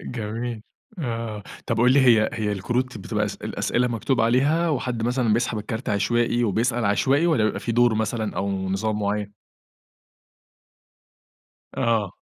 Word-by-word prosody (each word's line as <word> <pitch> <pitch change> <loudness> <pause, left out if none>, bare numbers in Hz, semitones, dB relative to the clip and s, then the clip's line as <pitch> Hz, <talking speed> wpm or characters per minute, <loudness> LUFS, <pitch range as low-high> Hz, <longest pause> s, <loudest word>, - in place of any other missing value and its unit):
جميل، 115 0 -5 0.4
آه 115 -7 -4 0.2
طب 115 - 0
قُل 125 +1 +5
لي، 140 - +5
هي 115 -4 +5
هي 105 -2 -1
الكروت 120 +5 -2
بتبقى 105 +2 -2
اسئ 105 - -6
الأسئلة 125 +1 0
مكتُوب 120 +2 0
عليها، 140 +9 +2
وحد 125 -5 -2
مثلًا 120 -1 +1
بيسحَب 115 0 0
الكارت 110 +3 -5
عشوائي، 120 +3 +1
وبيسأَل 115 +3 0
عشوائي، 135 +10 +2
والّا 155 -11 +2
بيبقى 110 - -1
في 115 - -2
دَور 120 0 +4
مثلًا 110 0 -2
أو 100 +1 -1 0.2
نظام 105 +3 -1
معيَّن؟ 105 0 -2 2.4
آه. 110 -5 0
115 Hz, 140 wpm, -24 LUFS, 105-125 Hz, 2.4 s, قُل